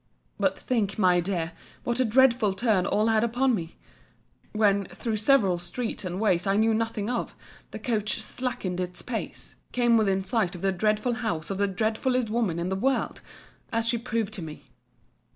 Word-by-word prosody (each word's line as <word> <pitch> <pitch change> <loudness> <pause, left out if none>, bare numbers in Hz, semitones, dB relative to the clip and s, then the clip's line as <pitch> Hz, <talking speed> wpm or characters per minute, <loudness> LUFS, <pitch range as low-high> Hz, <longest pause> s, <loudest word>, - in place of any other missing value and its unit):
But - - +1
think, 215 -6 -1
my 180 -4 +4
dear, 170 -2 -2 0.3
what 240 +1 -1
a 260 - +4
dreadful 235 -3 +4
turn 200 -4 +2
all 215 - +2
had 220 -1 +3
upon 245 +3 +2
me, 165 -6 -4 0.7
when, 200 -2 +2
through 215 +5 -3
several 210 -6 +3
streets 220 +8 -4
and 185 0 -4
ways 190 -4 +2
I 195 - +3
knew 220 +1 +3
nothing 220 -2 -1
of, 245 0 -2 0.3
the - - -7
coach 220 -4 -1
slackening 215 -6 -3
its 180 -1 -3
pace, 235 -3 -5
came 240 -2 +3
within 195 -3 +2
sight 195 -3 0
of 175 - -9
the 195 - +3
dreadful 215 +5 +1
house 210 -9 -3
of 195 - -3
the 200 - +3
dreadfullest 220 +4 0
woman 220 -8 0
in 170 +2 -2
the 190 - 0
world; 265 +7 0 0.5
as 230 -1 0
she 235 0 +1
proved 225 -3 -2
to 195 - -5
me. 155 -2 -8
215 Hz, 180 wpm, -27 LUFS, 190-235 Hz, 0.7 s, my